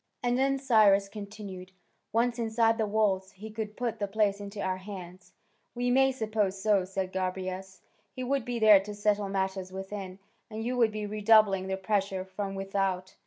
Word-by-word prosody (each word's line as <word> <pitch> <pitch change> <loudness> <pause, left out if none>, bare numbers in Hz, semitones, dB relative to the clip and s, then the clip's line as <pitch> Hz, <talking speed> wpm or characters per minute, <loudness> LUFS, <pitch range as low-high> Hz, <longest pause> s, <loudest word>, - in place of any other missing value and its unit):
"And 245 0 +2
then," 275 +1 +2
Cyrus 215 -7 +4
continued, 200 -2 -9 0.4
"once 235 +2 +1
inside 225 0 +2
the 220 - +1
walls, 195 -3 +1
he 215 +3 -9
could 215 -1 -5
put 235 -3 -2
the 205 - -1
place 205 0 +1
into 200 0 -7
our 185 -1 -1
hands?" 185 -2 -10 0.4
"We 245 0 0
may 265 +1 +4
suppose 215 -5 -1
so," 200 -2 +2
said 190 0 -4
Gobryas. 185 0 -4 0.3
"He 255 - -4
would 270 0 0
be 245 0 -3
there 215 -3 +7
to 205 +2 -7
settle 205 -1 +1
matters 190 -1 -2
within, 190 0 -6 0.3
and 220 0 -5
you 245 +2 -1
would 230 -3 +3
be 215 0 -4
redoubling 210 -2 +4
the 190 0 -2
pressure 195 -1 -1
from 195 +1 -5
without." 195 -1 -2
205 Hz, 175 wpm, -29 LUFS, 190-220 Hz, 0.4 s, there